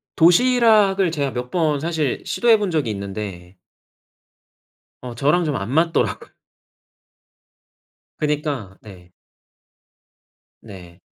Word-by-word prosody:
도시락을 200 Hz, -1 st, +4 dB
제가 140 Hz, -4 st, -2 dB
몇 125 Hz, 0 st, -6 dB
번 155 Hz, -5 st, 0 dB
사실 160 Hz, -5 st, -2 dB
시도해 235 Hz, -2 st, +3 dB
본 205 Hz, -4 st, -2 dB
적이 150 Hz, -7 st, -1 dB
있는데 100 Hz, -2 st, -7 dB, 1.5 s
어 125 Hz, -1 st, -7 dB
저랑 150 Hz, +8 st, +1 dB
좀 145 Hz, -3 st, -2 dB
안 100 Hz, 0 st, -4 dB
맞더라고요. 165 Hz, +3 st, 0 dB, 1.9 s
그니까 145 Hz, -10 st, -3 dB
네. 90 Hz, -4 st, -15 dB, 1.5 s
네. 90 Hz, -4 st, -13 dB
145 Hz, 185 characters per minute, -20 LUFS, 105-170 Hz, 1.9 s, 도시락을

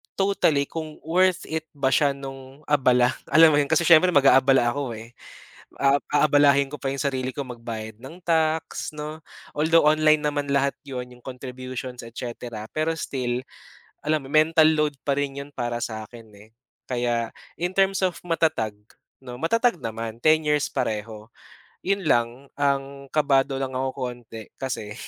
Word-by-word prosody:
totally 195 Hz, -7 st, +2 dB
kung 155 Hz, +1 st, -6 dB
worth 185 Hz, +3 st, +2 dB
it 160 Hz, 0 st, -4 dB
ba 135 Hz, -2 st, +1 dB
siya 140 Hz, +1 st, +3 dB
nung 135 Hz, 0 st, -10 dB
abala 125 Hz, -4 st, +4 dB, 0.2 s
alam 160 Hz, +2 st, +8 dB
mo 145 Hz, -, +3 dB
yun 145 Hz, -, +3 dB
kasi 160 Hz, +1 st, +4 dB
siyempre 170 Hz, +2 st, +6 dB
mag-aabala 135 Hz, -2 st, +5 dB
ako 135 Hz, -3 st, -4 dB
eh. 115 Hz, +2 st, -11 dB, 0.7 s
Ah, 140 Hz, 0 st, +4 dB, 0.2 s
aabalahin 145 Hz, -1 st, +4 dB
ko 145 Hz, -, -7 dB
pa 135 Hz, -2 st, -3 dB
yung 135 Hz, -, -4 dB
sarili 130 Hz, -2 st, -1 dB
ko 140 Hz, -1 st, -5 dB
magbayad 115 Hz, -2 st, -7 dB
ng 160 Hz, +7 st, -10 dB
tax, 160 Hz, -2 st, 0 dB
'no? 155 Hz, +1 st, -7 dB, 0.3 s
Although 160 Hz, +1 st, +4 dB
online 155 Hz, 0 st, +4 dB
naman 145 Hz, -1 st, -2 dB
lahat 140 Hz, 0 st, +1 dB
yun 130 Hz, -3 st, -6 dB
yung 125 Hz, -1 st, -17 dB
contributions 130 Hz, -1 st, -7 dB
etcetera, 115 Hz, -1 st, -7 dB
pero 155 Hz, +5 st, -1 dB
still, 125 Hz, -2 st, -3 dB, 0.5 s
alam 155 Hz, -2 st, -1 dB
mental 155 Hz, +1 st, +5 dB
load 150 Hz, -2 st, 0 dB
pa 140 Hz, -, +1 dB
rin 140 Hz, 0 st, -2 dB
yun 145 Hz, -, -16 dB
para 120 Hz, -3 st, -3 dB
sa'kin 110 Hz, 0 st, -7 dB
eh, 105 Hz, +2 st, -17 dB, 0.4 s
kaya 120 Hz, -2 st, -1 dB, 0.3 s
in 175 Hz, +2 st, -2 dB
terms 195 Hz, 0 st, +2 dB
of 180 Hz, -2 st, -1 dB
matatag, 160 Hz, -11 st, 0 dB, 0.4 s
'no 125 Hz, -2 st, -9 dB
matatag 230 Hz, +2 st, +1 dB
naman 115 Hz, 0 st, -5 dB
10 155 Hz, 0 st, +4 dB
years 150 Hz, -1 st, +1 dB
pareho, 110 Hz, +1 st, -4 dB, 0.5 s
yun 195 Hz, +1 st, -1 dB
lang, 120 Hz, 0 st, 0 dB
ang 140 Hz, -1 st, -1 dB
kabado 140 Hz, -2 st, +2 dB
lang 135 Hz, -1 st, -3 dB
ako 130 Hz, +1 st, -1 dB
konti 120 Hz, -3 st, -7 dB
kasi 115 Hz, -6 st, -4 dB
140 Hz, 155 wpm, -24 LUFS, 125-155 Hz, 0.7 s, alam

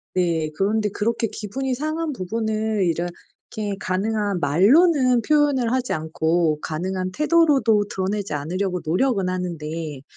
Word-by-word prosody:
네, 165 Hz, -4 st, 0 dB
그런데 210 Hz, +4 st, +1 dB
그렇게 225 Hz, +3 st, -1 dB
기분이 255 Hz, +6 st, -4 dB
상한 310 Hz, +3 st, -2 dB
부분을 220 Hz, 0 st, -1 dB
이렇게 175 Hz, +4 st, -4 dB
가능한 200 Hz, +1 st, -1 dB
말로는 250 Hz, -, +4 dB
표현을 285 Hz, -4 st, +2 dB
하지 255 Hz, 0 st, -1 dB
않고 160 Hz, 0 st, 0 dB
가능한 185 Hz, +3 st, -3 dB
태도로도 295 Hz, -, +3 dB
드러내지 195 Hz, -2 st, -2 dB
않으려고 180 Hz, +6 st, -2 dB
노력은 195 Hz, +4 st, +1 dB
하는데, 165 Hz, -5 st, -4 dB
200 Hz, 305 characters per minute, -22 LUFS, 175-240 Hz, -, 말로는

